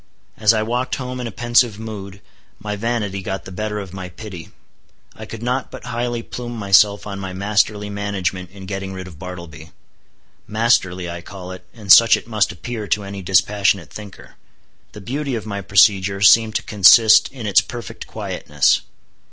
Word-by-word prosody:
As 110 Hz, -1 st, +4 dB
I 110 Hz, -1 st, +1 dB
walked 125 Hz, +3 st, -2 dB
home 125 Hz, -1 st, -6 dB
in 120 Hz, -, -4 dB
a -, -, -6 dB
pensive 120 Hz, +1 st, +2 dB
mood, 100 Hz, -3 st, -8 dB, 0.4 s
my 105 Hz, -1 st, -5 dB
vanity 105 Hz, -3 st, -2 dB
got 95 Hz, -1 st, -5 dB
the 95 Hz, -, -9 dB
better 105 Hz, +3 st, -4 dB
of 95 Hz, -3 st, -7 dB
my 95 Hz, -1 st, -7 dB
pity. 90 Hz, -2 st, -10 dB, 0.7 s
I -, -, -10 dB
could 115 Hz, 0 st, -8 dB
not 125 Hz, +2 st, -2 dB
but -, -, -10 dB
highly 120 Hz, 0 st, -3 dB
plume 120 Hz, 0 st, -7 dB
myself 100 Hz, 0 st, +3 dB
on 100 Hz, -2 st, -6 dB
my 95 Hz, -1 st, -6 dB
masterly 105 Hz, +1 st, 0 dB
management 100 Hz, -3 st, -3 dB
in 95 Hz, +1 st, -12 dB
getting 95 Hz, 0 st, -5 dB
rid 95 Hz, 0 st, -7 dB
of 80 Hz, -4 st, -13 dB
Bartleby. 85 Hz, -4 st, -9 dB, 0.8 s
Masterly 100 Hz, -5 st, +1 dB
I 85 Hz, 0 st, -6 dB
call 90 Hz, +1 st, -9 dB
it, 95 Hz, -, -11 dB
and 105 Hz, -5 st, -3 dB
such 115 Hz, +3 st, +8 dB
it -, -, -11 dB
must 110 Hz, -4 st, +1 dB
appear 110 Hz, +4 st, -6 dB
to 105 Hz, -, 0 dB
any 100 Hz, 0 st, -7 dB
dispassionate 95 Hz, -4 st, +1 dB
thinker. 105 Hz, -2 st, -12 dB, 0.6 s
The 105 Hz, -, -10 dB
beauty 135 Hz, +5 st, -3 dB
of 110 Hz, -, -5 dB
my 100 Hz, -2 st, -4 dB
procedure 100 Hz, 0 st, +3 dB
seemed 110 Hz, +2 st, +5 dB
to -, -, 0 dB
consist 110 Hz, +2 st, +6 dB
in 125 Hz, -5 st, -8 dB
its 100 Hz, -, +4 dB
perfect 120 Hz, -1 st, -9 dB
quietness. 75 Hz, -2 st, 0 dB
100 Hz, 175 wpm, -20 LUFS, 95-115 Hz, 0.8 s, such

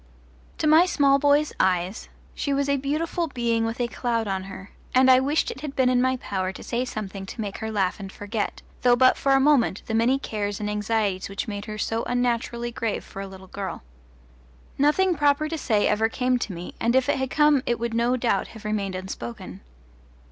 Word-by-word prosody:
To -, -, -2 dB
my 315 Hz, +4 st, +6 dB
small 280 Hz, -5 st, +3 dB
boy's 290 Hz, +1 st, +3 dB
eyes 185 Hz, +3 st, 0 dB, 0.2 s
she 280 Hz, -, -2 dB
was 280 Hz, 0 st, 0 dB
a 280 Hz, 0 st, +2 dB
beautiful 315 Hz, +5 st, -1 dB
being 235 Hz, -4 st, 0 dB
with 225 Hz, +1 st, -4 dB
a 240 Hz, -, +1 dB
cloud 230 Hz, -1 st, -2 dB
on 190 Hz, -1 st, -2 dB
her, 195 Hz, 0 st, -10 dB, 0.2 s
and 260 Hz, 0 st, +6 dB
I 255 Hz, -, +7 dB
wished 285 Hz, +4 st, +1 dB
it 265 Hz, -, -9 dB
had 295 Hz, -2 st, -6 dB
been 260 Hz, -1 st, +3 dB
in 250 Hz, -1 st, +3 dB
my 260 Hz, 0 st, +1 dB
power 190 Hz, -5 st, -3 dB
to -, -, -10 dB
say 245 Hz, +1 st, -2 dB
something 195 Hz, -4 st, -6 dB
to 230 Hz, -, -9 dB
make 205 Hz, -3 st, -4 dB
her 220 Hz, -, -4 dB
laugh 195 Hz, -2 st, 0 dB
and 195 Hz, -1 st, -7 dB
forget, 205 Hz, +2 st, -4 dB, 0.2 s
though 245 Hz, -1 st, +5 dB
but 255 Hz, +1 st, +5 dB
for 275 Hz, -, +1 dB
a 270 Hz, -, +5 dB
minute, 270 Hz, -8 st, +3 dB
the 225 Hz, -, -4 dB
many 235 Hz, +4 st, +3 dB
cares 205 Hz, -6 st, -3 dB
and 210 Hz, 0 st, -2 dB
anxieties 210 Hz, -2 st, -1 dB
which 200 Hz, +4 st, -4 dB
made 205 Hz, -1 st, -5 dB
her 215 Hz, -1 st, -6 dB
so 225 Hz, +2 st, -1 dB
unnaturally 240 Hz, -1 st, -1 dB
grave 230 Hz, -2 st, -2 dB
for 195 Hz, -, -8 dB
a 195 Hz, -, -5 dB
little 190 Hz, 0 st, -12 dB
girl. 190 Hz, -, -6 dB, 0.9 s
Nothing 330 Hz, +7 st, +3 dB
proper 290 Hz, 0 st, +2 dB
to 325 Hz, -, -3 dB
say 215 Hz, -7 st, +2 dB
ever 220 Hz, +1 st, +2 dB
came 250 Hz, +1 st, 0 dB
to 215 Hz, -, -3 dB
me, 175 Hz, 0 st, -7 dB
and 235 Hz, +2 st, +1 dB
if 260 Hz, -1 st, +3 dB
it -, -, +1 dB
had 265 Hz, -1 st, -1 dB
come 295 Hz, -2 st, +4 dB
it 240 Hz, -, +1 dB
would 235 Hz, 0 st, -3 dB
no 235 Hz, +2 st, +2 dB
doubt 240 Hz, -1 st, 0 dB
have 220 Hz, -1 st, -11 dB
remained 200 Hz, -3 st, -2 dB
unspoken. 185 Hz, -11 st, -7 dB
235 Hz, 215 wpm, -25 LUFS, 205-270 Hz, 0.9 s, I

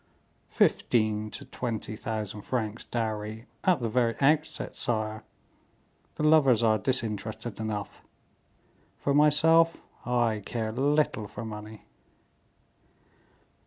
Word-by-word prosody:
"Fifteen 110 Hz, -2 st, +1 dB
to -, -, -8 dB
twenty 110 Hz, -3 st, -4 dB
thousand 110 Hz, -2 st, -4 dB
francs 110 Hz, -1 st, -3 dB
dowry 110 Hz, -1 st, -3 dB, 0.2 s
at 180 Hz, -8 st, +3 dB
the 115 Hz, -, 0 dB
very 115 Hz, 0 st, +1 dB
outset, 150 Hz, +2 st, +1 dB
sire; 110 Hz, -2 st, -1 dB, 0.9 s
the -, -, -3 dB
lovers 140 Hz, -7 st, +5 dB
are 110 Hz, -1 st, +3 dB
disinterested 110 Hz, -2 st, -2 dB
enough; 105 Hz, -2 st, -4 dB, 1.0 s
for 140 Hz, -, 0 dB
myself, 160 Hz, +3 st, +5 dB, 0.2 s
I 120 Hz, -3 st, +1 dB
care 110 Hz, +1 st, -3 dB
little 140 Hz, -3 st, +1 dB
for 115 Hz, -, -7 dB
money." 105 Hz, 0 st, -9 dB
115 Hz, 100 wpm, -28 LUFS, 110-130 Hz, 1.0 s, lovers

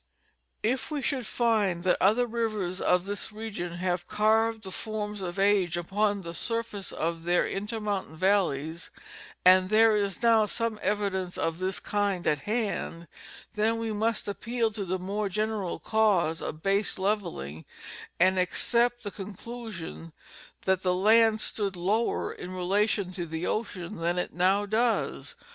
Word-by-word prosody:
If 250 Hz, +4 st, 0 dB
we 295 Hz, -3 st, -3 dB
should 260 Hz, -5 st, -1 dB
find 210 Hz, -7 st, +1 dB
that 185 Hz, -, +2 dB
other 220 Hz, +6 st, +4 dB
rivers 215 Hz, -6 st, -2 dB
of 180 Hz, 0 st, +2 dB
this 205 Hz, +2 st, -3 dB
region 210 Hz, -5 st, -5 dB
have 175 Hz, 0 st, -2 dB
carved, 220 Hz, +1 st, +2 dB
the 190 Hz, -, -7 dB
forms 210 Hz, -1 st, -4 dB
of 175 Hz, -1 st, -4 dB
age 195 Hz, -4 st, +3 dB
upon 200 Hz, +3 st, 0 dB
the 170 Hz, -2 st, -7 dB
surfaces 230 Hz, -2 st, -3 dB
of 165 Hz, 0 st, -2 dB
their 175 Hz, +1 st, +2 dB
intermontane 205 Hz, -4 st, -3 dB
valleys, 170 Hz, -4 st, +1 dB, 0.6 s
and 185 Hz, 0 st, +7 dB
there 220 Hz, +1 st, +5 dB
is 200 Hz, 0 st, -1 dB
now 225 Hz, -2 st, +5 dB
some 230 Hz, 0 st, -2 dB
evidence 195 Hz, -3 st, -1 dB
of 165 Hz, +1 st, -1 dB
this 185 Hz, +1 st, -1 dB
kind 200 Hz, -3 st, -1 dB
at 150 Hz, -, +2 dB
hand, 210 Hz, -7 st, -2 dB, 0.5 s
then 220 Hz, +2 st, +1 dB
we 225 Hz, -1 st, -2 dB
must 220 Hz, +1 st, 0 dB
appeal 230 Hz, +2 st, -1 dB
to 205 Hz, -2 st, -4 dB
the 185 Hz, +1 st, -1 dB
moi'e 200 Hz, +3 st, -2 dB
general 210 Hz, -2 st, -1 dB
cause 195 Hz, -7 st, +2 dB
of 155 Hz, +1 st, -6 dB
base 200 Hz, +1 st, +1 dB
levelling 175 Hz, -, -2 dB, 0.6 s
and 185 Hz, +1 st, +4 dB
accept 240 Hz, +6 st, +2 dB
the 205 Hz, -, -4 dB
conclusion 195 Hz, -, -8 dB, 0.5 s
that 190 Hz, -1 st, +2 dB
the 180 Hz, -1 st, +1 dB
land 220 Hz, +3 st, +5 dB
stood 200 Hz, -3 st, -2 dB
lower 200 Hz, +7 st, 0 dB
in 185 Hz, +1 st, -7 dB
relation 195 Hz, +1 st, +1 dB
to 175 Hz, -2 st, -4 dB
the 160 Hz, +2 st, -3 dB
ocean 210 Hz, -3 st, -3 dB
than 170 Hz, +2 st, 0 dB
it 180 Hz, -, -2 dB
now 190 Hz, +3 st, +3 dB
does. 225 Hz, +3 st, 0 dB
200 Hz, 150 wpm, -28 LUFS, 180-220 Hz, 0.6 s, and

